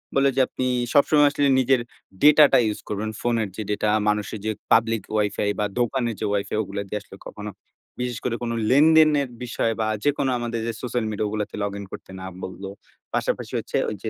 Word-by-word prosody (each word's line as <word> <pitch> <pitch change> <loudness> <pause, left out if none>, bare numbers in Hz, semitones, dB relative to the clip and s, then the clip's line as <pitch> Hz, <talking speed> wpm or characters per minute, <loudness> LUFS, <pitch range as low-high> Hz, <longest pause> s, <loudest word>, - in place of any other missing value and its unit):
বললো, 135 0 +4
যে 135 - +4
আপনি 130 - -3 0.3
সবসময় 145 0 +5
আসলে 145 -1 +1
নিজের 130 -1 +3 0.4
ডেটা 150 0 +8
টা - - +8
ইউস 105 -1 -2
করবেন, 105 +1 -2
ফোনের 115 -4 0
যে 110 - -4
ডেটা 105 +1 0 0.2
মানুষের 105 0 -2
যে 110 - +1 0.2
পাবলিক 115 -2 +3 0.2
Wi-Fi 105 -1 0
বা 105 - +1
দোকানের 120 -1 0
যে 110 - -2
Wi-Fi 100 +1 -1
ওগুলা 100 0 -4
দিয়ে 105 +2 -3
আসলে 105 -2 -14
কখনো 105 0 -7 0.5
বিশেষ 125 0 -3
করে 120 -2 0
কোনো 115 0 -2
লেনদেনের 150 -1 +5
বিষয়, 115 -1 -1
বা 110 - 0 0.2
যেকোনো 140 -2 +1
আমাদের 115 -1 -3
যে 115 - -2
সোশ্যাল 120 -2 -2
মিডিয়া 105 0 -1
ওগুলাতে 105 0 -4
লগইন 100 0 -4
করতে - - -10
না - - -6 0.2
বলল। 95 +1 -7 0.5
পাশাপাশি - - -2
হচ্ছে - - -3
ওই 110 - -4
যে 110 - -2
115 Hz, 190 wpm, -24 LUFS, 105-130 Hz, 0.5 s, ডেটা